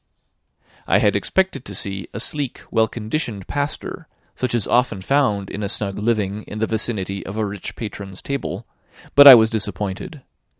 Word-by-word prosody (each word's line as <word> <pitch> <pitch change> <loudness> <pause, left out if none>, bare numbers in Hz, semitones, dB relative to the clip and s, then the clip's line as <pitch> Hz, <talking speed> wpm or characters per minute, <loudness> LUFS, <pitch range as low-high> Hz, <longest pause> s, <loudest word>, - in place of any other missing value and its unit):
I - - +4
had - - +2
expected 190 -9 0
to 100 - -7
see 95 -1 -3
a - - -6
sleek, 145 -4 -2
well 110 -1 +3
conditioned 110 - -4
pastor, 145 0 -4 0.3
such 125 -2 -2
as 115 - +1
is - - -4
often 120 -5 +2
found 105 -3 0
in 105 - -5
a 100 - -2
snug 100 -2 -1
living 105 -2 -1
in 105 - -7
the 110 - +1
vicinity 105 -4 -2
of 100 +3 -7
a 110 - 0
rich 100 -2 -6
patron's 100 -3 -7
table; 140 0 -4 0.5
but 145 0 +9
I 135 - +14
was 110 -1 +4
disappointed. 105 - -4
110 Hz, 175 wpm, -21 LUFS, 100-125 Hz, 0.5 s, I